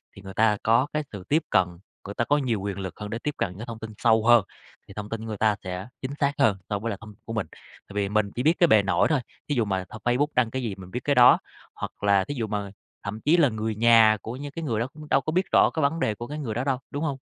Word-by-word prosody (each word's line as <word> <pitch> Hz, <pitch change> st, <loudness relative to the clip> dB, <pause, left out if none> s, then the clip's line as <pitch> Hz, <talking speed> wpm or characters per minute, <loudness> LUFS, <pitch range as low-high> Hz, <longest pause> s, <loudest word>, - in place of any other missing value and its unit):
thì 100 Hz, -, -12 dB
người 95 Hz, 0 st, -9 dB
ta 110 Hz, -1 st, +3 dB
có 115 Hz, +5 st, +3 dB
cái 150 Hz, 0 st, 0 dB
sự 100 Hz, -3 st, -8 dB
tiếp 155 Hz, +3 st, +3 dB
cận, 95 Hz, -3 st, +3 dB, 0.4 s
người 100 Hz, -, -6 dB
ta -, -, +1 dB
có 145 Hz, +3 st, +3 dB
nhiều 120 Hz, -8 st, -1 dB
quyền 100 Hz, -1 st, -4 dB
lực 95 Hz, -1 st, -6 dB
hơn 105 Hz, 0 st, -5 dB
để 115 Hz, -, -4 dB
tiếp 150 Hz, +3 st, -3 dB
cận 90 Hz, 0 st, -2 dB
những 110 Hz, -, -6 dB
thông 115 Hz, -1 st, -7 dB
tin 110 Hz, -1 st, -7 dB
sâu 110 Hz, -1 st, +3 dB
hơn, 120 Hz, -3 st, +6 dB, 0.4 s
thì 100 Hz, -, -12 dB
thông 105 Hz, +1 st, -6 dB
tin 115 Hz, 0 st, -5 dB
người 110 Hz, -2 st, -5 dB
ta 105 Hz, 0 st, +3 dB
sẽ 90 Hz, +3 st, -5 dB
chính 130 Hz, +1 st, -4 dB
xác 140 Hz, -1 st, +2 dB
hơn 105 Hz, -3 st, +4 dB
so 105 Hz, -, -1 dB
với 115 Hz, +3 st, -3 dB
lại 100 Hz, -, -3 dB
thông 105 Hz, -1 st, -11 dB
t -, -, -34 dB
của 115 Hz, -, -6 dB
mình. 110 Hz, -7 st, -2 dB
Tại 100 Hz, -, -17 dB
vì 100 Hz, -1 st, 0 dB
mình 105 Hz, -1 st, +1 dB
chỉ 125 Hz, -, -1 dB
biết 160 Hz, +3 st, +5 dB
cái 175 Hz, -, +6 dB
bề 110 Hz, -8 st, +5 dB
nổi 100 Hz, -, +2 dB
thôi, 145 Hz, -5 st, +2 dB, 0.3 s
thí 145 Hz, -, +1 dB
dụ 115 Hz, -3 st, +2 dB
mà 95 Hz, -2 st, -2 dB
thằng 110 Hz, -, -10 dB
Facebook 125 Hz, +4 st, +2 dB
đăng 120 Hz, -3 st, +2 dB
cái 130 Hz, +1 st, -2 dB
gì 110 Hz, -5 st, -3 dB
mình 95 Hz, -1 st, -12 dB
biết 125 Hz, -, -3 dB
cái 145 Hz, -2 st, +1 dB
đó, 125 Hz, 0 st, +7 dB, 0.4 s
hoặc -, -, -7 dB
là 100 Hz, -1 st, +4 dB
thí 145 Hz, -, -5 dB
dụ 115 Hz, -4 st, -2 dB
mà 100 Hz, -2 st, -3 dB, 0.3 s
thậm 105 Hz, +2 st, -5 dB
chí 165 Hz, +4 st, +4 dB
là 145 Hz, -6 st, +5 dB
người 110 Hz, 0 st, -3 dB
nhà 115 Hz, -1 st, +6 dB
của 115 Hz, -, -6 dB
những 140 Hz, +2 st, -7 dB
cái 165 Hz, +3 st, -6 dB
người 115 Hz, -8 st, -1 dB
đó 115 Hz, -, -1 dB
cũng 150 Hz, -1 st, -12 dB
đâu 135 Hz, -, +4 dB
có 155 Hz, -, -3 dB
biết 185 Hz, +3 st, +1 dB
rõ -, -, +5 dB
cái 160 Hz, -, -1 dB
vấn 160 Hz, +4 st, +1 dB
đề 105 Hz, -7 st, 0 dB
của 120 Hz, +2 st, -7 dB
cái 150 Hz, +1 st, -6 dB
người 120 Hz, -7 st, -3 dB
đó 120 Hz, +3 st, -2 dB
đâu, 135 Hz, -2 st, 0 dB
đúng 145 Hz, +2 st, -3 dB
hông? 145 Hz, -4 st, -1 dB
115 Hz, 310 wpm, -25 LUFS, 105-135 Hz, 0.4 s, đó